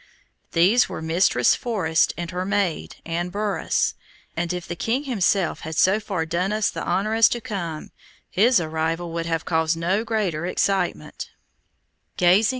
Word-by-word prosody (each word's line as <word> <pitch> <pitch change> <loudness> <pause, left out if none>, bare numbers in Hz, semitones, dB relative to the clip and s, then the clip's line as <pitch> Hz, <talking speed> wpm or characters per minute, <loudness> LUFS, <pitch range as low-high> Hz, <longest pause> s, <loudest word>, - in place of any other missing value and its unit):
These 190 +9 +4
were - - -5
Mistress 160 +4 +3
Forest, 185 -9 +1
and 170 0 -4
her 180 0 -2
maid, 185 - -1
Anne 170 +2 -2
Burras, 205 +2 0 0.4
and 175 0 -1
if 180 -1 -4
the 175 - -4
king 235 - -1
himself 200 - +1
had 160 0 -6
so 195 +3 +4
far 195 -6 -3
done 175 +4 -1
us 215 0 +1
the - - -5
honor 215 +3 0
as 225 0 +6
to 240 - -2
come, 170 -8 -5 0.4
his 230 +3 +4
arrival 165 +1 -2
would 165 0 -3
have 165 -1 -1
caused 160 0 +1
no 185 +6 0
greater 195 -8 -1
excitement. 195 +1 -1
180 Hz, 150 wpm, -23 LUFS, 165-205 Hz, 0.4 s, as